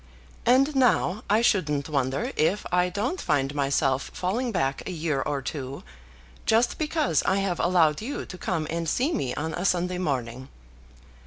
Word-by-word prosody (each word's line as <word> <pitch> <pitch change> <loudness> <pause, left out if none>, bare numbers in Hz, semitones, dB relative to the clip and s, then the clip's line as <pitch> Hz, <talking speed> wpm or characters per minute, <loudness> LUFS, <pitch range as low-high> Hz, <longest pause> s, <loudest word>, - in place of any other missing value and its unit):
And 270 +4 +4
now 230 -6 +2
I 215 +3 +3
shouldn't 150 -10 +1
wonder 140 - -1
if 190 +7 +1
I 180 0 +3
don't 225 - -2
find 140 -3 0
myself 135 -1 0
falling 230 +7 -1
back 135 -8 -1
a - - -3
year 155 -5 -1
or 140 -1 -2
two, 135 -1 -5 0.6
just 230 +2 +2
because 305 - +1
I 190 - +1
have 195 -3 -1
allowed 170 -3 +3
you 265 +6 -4
to 185 - -9
come 165 -4 -1
and 165 -1 -2
see 275 - +1
me 130 - -2
on 160 +2 -3
a 175 - -3
Sunday 180 -1 0
morning. 130 -5 -3
175 Hz, 165 wpm, -26 LUFS, 140-215 Hz, 0.6 s, And